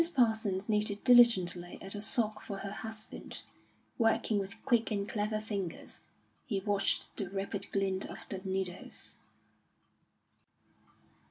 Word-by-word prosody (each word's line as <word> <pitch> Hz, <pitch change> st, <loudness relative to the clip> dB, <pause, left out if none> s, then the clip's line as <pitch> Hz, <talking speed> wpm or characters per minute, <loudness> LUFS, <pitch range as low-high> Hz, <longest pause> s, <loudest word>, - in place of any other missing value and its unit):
Parsons 220 Hz, -6 st, +2 dB
knitted 210 Hz, -1 st, 0 dB
diligently 190 Hz, -8 st, +5 dB
at 195 Hz, -, -5 dB
a 205 Hz, -, -4 dB
sock 215 Hz, -1 st, +1 dB
for 200 Hz, -, -5 dB
her 195 Hz, 0 st, -5 dB
husband, 220 Hz, +1 st, -7 dB, 0.6 s
working 225 Hz, -2 st, +3 dB
with 195 Hz, 0 st, -6 dB
quick 235 Hz, -2 st, +3 dB
and 200 Hz, -2 st, -1 dB
clever 215 Hz, 0 st, -1 dB
fingers. 200 Hz, -5 st, -5 dB, 0.5 s
He 205 Hz, -7 st, 0 dB
watched 200 Hz, 0 st, +1 dB
the 195 Hz, -3 st, -3 dB
rapid 195 Hz, +1 st, -4 dB
glint 195 Hz, -1 st, 0 dB
of -, -, -9 dB
the 195 Hz, -, -4 dB
needles. 190 Hz, -2 st, -3 dB
205 Hz, 120 wpm, -32 LUFS, 195-220 Hz, 0.6 s, diligently